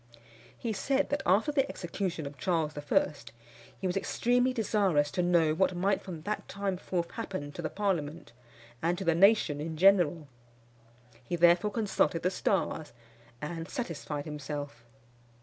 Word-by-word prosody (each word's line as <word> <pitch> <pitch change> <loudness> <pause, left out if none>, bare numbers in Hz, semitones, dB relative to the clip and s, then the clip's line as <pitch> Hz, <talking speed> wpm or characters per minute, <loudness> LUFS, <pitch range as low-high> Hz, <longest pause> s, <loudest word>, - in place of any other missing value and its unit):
He 230 -2 -3
said 270 +7 0
that, 285 - 0
after 205 - +3
the 280 -2 +1
execution 175 -2 -4
of 140 +1 -7
Charles 160 -1 0
I., 145 +1 +1 0.7
he - - -5
was 180 0 0
extremely 245 +5 +1
desirous 195 -10 +1
to 180 - 0
know 170 -3 +3
what 185 +2 +1
might 195 +2 +1
from 170 -5 -8
that 210 +2 -3
time 200 -2 -2
forth 175 -1 -3
happen 185 -10 -5
to 170 - -7
the 155 - -2
parliament 170 - -2 0.5
and 170 +2 +1
to 195 - -4
the 170 - +4
nation 175 -5 +4
in 160 0 -4
general. 175 -4 +4 1.0
He 150 - -3
therefore 175 +4 +5
consulted 205 -6 0
the 180 - +2
stars, 160 -5 -1 0.5
and 165 +2 -5
satisfied 155 - -4
himself. 145 -4 -6
175 Hz, 150 wpm, -30 LUFS, 155-200 Hz, 1.0 s, therefore